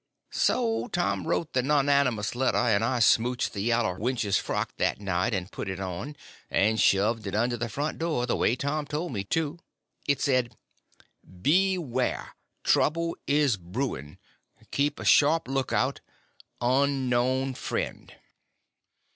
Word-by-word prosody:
So 230 -1 +1
Tom 175 -6 -1
he - - -8
wrote 165 -1 -1
the 125 - +2
nonnamous 140 -5 +2
letter, 130 +2 +1
and 110 -3 +2
I 125 +2 +1
smouched 120 +2 +2
the 100 - -3
yaller 115 -4 0
wench's 115 -4 0
frock - - -3
that - - 0
night, 95 +1 0
and 95 -2 -3
put - - -5
it 95 0 -4
on, 95 +10 -5 0.3
and 110 +3 +2
shoved 105 +2 +2
it 95 - -3
under 120 +3 +1
the 120 0 -3
front 145 +8 -3
door, 160 -7 0
the 120 - 0
way 115 - +2
Tom 145 +3 -2
told 150 +2 -3
me 100 -3 -2
to. 160 - -1 0.5
It 140 -2 +2
said: 125 -4 +1 0.9
Beware. 165 -7 +1 0.3
Trouble 165 +2 +2
is 140 -5 +3
brewing. 90 - -4 0.5
Keep 145 +1 0
a - - -6
sharp 155 +1 +4
lookout. 135 0 0 0.6
UNKNOWN 130 0 +1
FRIEND. - - -4
125 Hz, 140 wpm, -27 LUFS, 110-145 Hz, 0.9 s, sharp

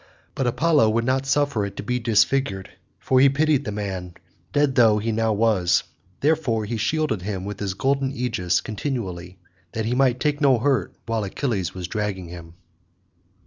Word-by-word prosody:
But 135 - -1
Apollo 140 0 +3
would 115 +2 0
not 130 +1 0
suffer 140 -5 +1
it 100 - -6
to - - -4
be 125 +4 -1
disfigured, 110 -3 +1 0.3
for 130 - +2
he 135 +1 +7
pitied 145 0 +1
the 105 - -3
man, 95 -4 -5 0.4
dead 145 -2 +2
though 115 -4 +5
he 110 +2 -1
now 110 0 +1
was; 105 -5 +2 0.4
therefore 140 -8 +1
he 115 +3 -3
shielded 150 - 0
him 95 -1 -4
with 100 0 -6
his 95 -2 -3
golden 135 +4 0
aegis 115 -9 -1
continually, 95 -7 -5 0.4
that 110 -1 -2
he 115 - 0
might 130 -1 +2
take 150 +1 0
no 135 -4 +5
hurt 135 +3 0
while 115 -1 -1
Achilles 100 - -2
was 90 -2 -5
dragging 100 -4 -3
him. 85 -1 -10
115 Hz, 175 wpm, -23 LUFS, 100-135 Hz, 0.4 s, he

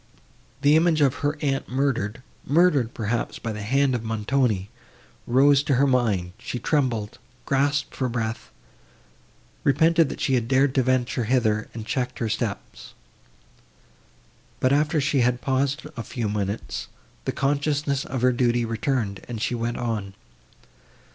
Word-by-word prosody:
The 145 +1 +6
image 160 -1 +3
of 140 -2 +3
her 145 +2 0
aunt 135 -2 -1
murdered—murdered, 130 - 0
perhaps, 115 +1 -2
by 115 - -4
the 105 - -6
hand 135 +5 +2
of 120 -3 -2
Montoni, 110 -2 0 0.6
rose 135 +3 +5
to 145 -2 +1
her 135 +3 +4
mind; 110 -9 +1
she 125 0 -5
trembled, 120 -5 -1 0.3
gasped 140 +1 +1
for 130 -2 -1
breath—repented 120 - -2
that - - -6
she 135 - 0
had 120 -3 +1
dared 130 +1 +3
to 135 - +3
venture 125 -1 0
hither, 110 -3 +1
and 110 -2 -6
checked 125 +2 -2
her 115 - -2
steps. 110 -1 -4 1.6
But, 130 +1 +3
after 150 +2 +2
she 140 0 +1
had 125 0 +2
paused 135 +3 0
a 115 - -4
few 115 0 -4
minutes, 105 0 -3 0.4
the - - 0
consciousness 140 0 0
of 130 -2 -4
her 125 - +5
duty 120 -1 +1
returned, 115 -3 -2
and 120 -2 -5
she 120 - -1
went 120 0 -2
on. 105 -5 -3
125 Hz, 140 wpm, -24 LUFS, 115-140 Hz, 1.6 s, The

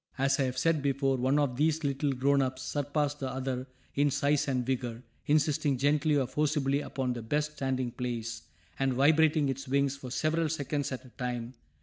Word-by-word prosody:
As 135 +1 +2
I 135 - +3
have 130 0 -3
said 160 +2 +2
before, 135 -1 +1
one 130 +3 +2
of 140 -4 +1
these 155 +2 +1
little 140 0 0
grown 140 +2 +3
ups 130 0 -2
surpassed 145 +2 -1
the 135 - -3
other 130 0 -3 0.3
in 145 +1 +3
size 140 +2 +1
and 130 -3 0
vigor, 125 -2 -2 0.2
insisting 145 -2 +2
gently 145 +2 +2
or 135 - +2
forcibly 140 +1 0
upon 130 -3 -2
the 120 - -5
best 150 +6 -1
standing 130 -4 -2
place, 115 -2 -4 0.4
and 135 -1 +2
vibrating 155 +2 +4
its 135 +1 -3
wings 140 +1 +1
for 135 -2 -8
several 155 +5 0
seconds 145 -2 -2
at 130 0 -5
a - - -13
time. 125 -1 -4
135 Hz, 190 wpm, -30 LUFS, 130-145 Hz, 0.4 s, vibrating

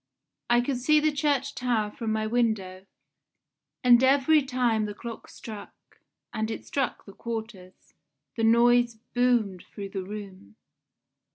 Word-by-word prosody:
I 240 0 +4
could 255 +1 -2
see 305 +4 +4
the 305 0 +2
church 285 -1 0
tower 230 -4 -1
from 225 -1 -4
my 215 0 -1
window, 215 -5 -1 1.0
and 245 0 +6
every 280 +3 +4
time 250 -5 0
the 205 -1 -6
clock 230 +1 -9
struck 215 -3 -11 0.3
and 220 0 -2
it 225 - -6
struck 270 -4 -2
the 200 - -12
quarters 220 -6 -8 0.4
the 225 - -2
noise 235 +1 +4 0.2
boomed 240 -7 +1
through 200 -1 -7
the 195 -1 -4
room. 190 - -9
235 Hz, 140 wpm, -27 LUFS, 210-250 Hz, 1.0 s, and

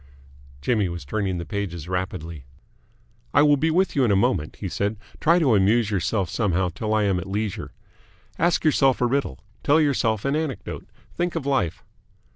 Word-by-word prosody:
Jimmy 105 -6 +1
was 85 -3 -6
turning 95 +3 -2
the 85 - -5
pages 85 -3 -4
rapidly. 90 -4 -4 0.9
"I 145 - +7
will 145 -1 +5
be 155 +4 +1
with 185 +3 +1
you 140 - +3
in 120 - +3
a 100 - +4
moment," 100 -7 +1
he - - -5
said. 105 +2 -2 0.2
"Try 170 +2 +4
to 145 -9 +3
amuse 105 +2 +3
yourself 95 +1 0
somehow 95 -1 0
till 105 +5 -4
I 110 - +2
am 95 -3 +1
at 90 - -7
leisure. 105 0 -3 0.7
Ask 170 -1 +2
yourself 135 -4 +3
a - - +4
riddle. 120 - -1 0.2
Tell 145 +3 +4
yourself 120 -8 +1
an 140 +1 +1
anecdote. 155 -6 -4 0.2
Think 175 0 -2
of 160 -5 -3
life. 135 - 0
110 Hz, 180 wpm, -24 LUFS, 95-140 Hz, 0.9 s, I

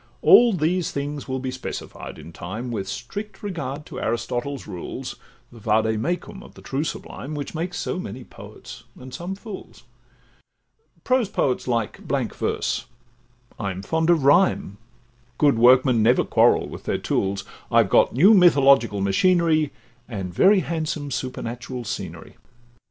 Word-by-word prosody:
All 240 -2 +7
these 175 0 0
things 145 0 -4
will 130 0 -2
be 130 0 -4
specified 130 0 -7
in 85 - -11
time, 110 +8 -6
With 95 -4 -3
strict 195 - -7
regard 150 -7 -4
to - - -8
Aristotle's 120 +3 -3
rules, 90 -4 -6 0.4
The 120 - -13
Vade 110 0 +1
Mecum 180 - -3
of - - -15
the - - -13
true 135 +2 -2
sublime, 155 -1 -6
Which 145 -2 -5
makes 175 +2 -3
so - - -3
many 130 -8 -7
poets, - - -12 0.2
and 130 0 -11
some 175 +7 -5
fools: 205 -1 -10 1.2
Prose 255 -5 +2
poets 130 -12 -1
like 115 -3 -1
blank - - -2
verse, - - -2 0.7
I'm 95 -3 -4
fond 160 +8 0
of 165 -5 +4
rhyme, 140 - +3 0.6
Good 145 -6 +3
workmen 125 0 +5
never 120 +4 +4
quarrel - - +3
with - - -10
their - - 0
tools; 100 0 -1 0.3
I've - - +4
got - - +4
new 180 - +6
mythological 140 - +5
machinery, 155 - +2 0.4
And 95 -6 -5
very 195 - +5
handsome 155 -4 -3
supernatural 125 -1 -5
scenery. - - -7
135 Hz, 145 wpm, -23 LUFS, 115-170 Hz, 1.2 s, All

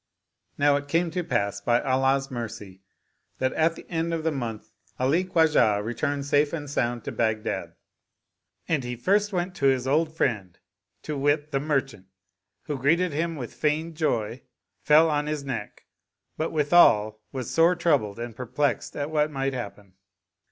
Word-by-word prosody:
Now 145 0 +4
it 145 0 -6
came 165 +3 +1
to 180 +1 -2
pass 100 - -1
by 120 +3 +2
Allah's 135 0 +1
mercy 105 -6 -7 0.6
that 130 0 0
at 165 +1 +2
the - - -12
end 165 0 -1
of 160 - -4
the 160 - +1
month 115 -6 -5 0.3
Ali 140 +8 +2
Khwajah 155 - +3
returned 140 +5 -2
safe 145 +1 +2
and 150 -3 -4
sound 120 -4 -1
to - - -5
Baghdad; 110 -2 -2 0.9
and 155 -5 0
he 125 0 -4
first 200 - +1
went 180 -1 -2
to 140 - +2
his 130 -2 +2
old 155 +3 +2
friend, 100 - -1 0.5
to 150 - -4
wit, 145 +2 0
the 135 - +1
merchant 135 -9 -2 0.6
who, 145 -3 -4
greet 145 +7 +3
ing 180 -2 0
hii^ 165 +2 -2
with 125 -4 -6
feigned 155 +2 -1
joy, 120 -7 -1 0.4
fell 155 +2 +6
on 150 -1 0
his 150 -2 -3
neck, 125 -7 -6 0.5
but 160 - -2
withal 125 -9 +4
was 130 -4 -5
sore 165 +2 +4
troubled 145 - +1
and 120 -1 -6
perplexed 130 +4 -2
at 145 +1 -3
what 150 -1 +2
might 135 -2 -2
happen. 100 -5 -7
140 Hz, 165 wpm, -26 LUFS, 120-160 Hz, 0.9 s, fell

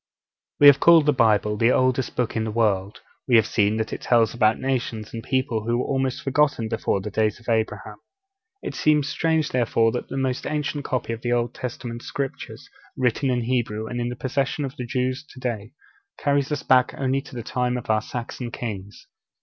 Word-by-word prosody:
We 145 - +6
have 145 -1 +9
called 165 -3 +6
the 150 - +4
Bible 105 -3 +2
the 115 +3 +4
oldest 130 0 +1
Book 125 -2 -1
in 110 - 0
the 110 - -3
world; 105 -3 0 0.3
we 125 - +4
have 110 - +6
seen 105 0 +1
that 110 0 -2
it - - -5
tells 115 -3 +3
about 110 -2 +3
nations 120 -5 -3
and 115 - -5
people 130 -3 -1
who 120 +1 +1
were 125 - -1
almost 135 -2 -1
forgotten 140 -4 +1
before 110 -3 -1
the 105 - -6
days 110 +1 0
of 120 - -20
Abraham. 110 -2 -1 0.7
It - - -4
seems 150 -2 +2
strange, 160 0 0
therefore, 115 -2 +2
that 125 - -4
the - - -4
most 130 -1 -1
ancient 150 -1 -2
copy 125 -2 -2
of 115 - -7
the 120 - -2
Old 120 0 0
Testament 120 -1 -6
Scriptures, 135 0 -6 0.3
written 130 +2 +1
in 125 -1 +1
Hebrew 115 -3 -1
and 120 +2 -4
in 120 - -1
the 125 - -5
possession 135 +3 -1
of 135 - -7
the 125 - -6
Jews 130 +3 -1
to - - -10
day, 115 -3 -4 0.4
carries 140 0 0
us 150 - -2
back 125 -1 +3
only 135 0 0
to 135 - -13
the 120 - -5
time 125 +1 -1
of 120 - -3
our 110 0 +2
Saxon 120 +1 -6
kings. 105 -4 -7
120 Hz, 205 wpm, -24 LUFS, 110-135 Hz, 0.7 s, have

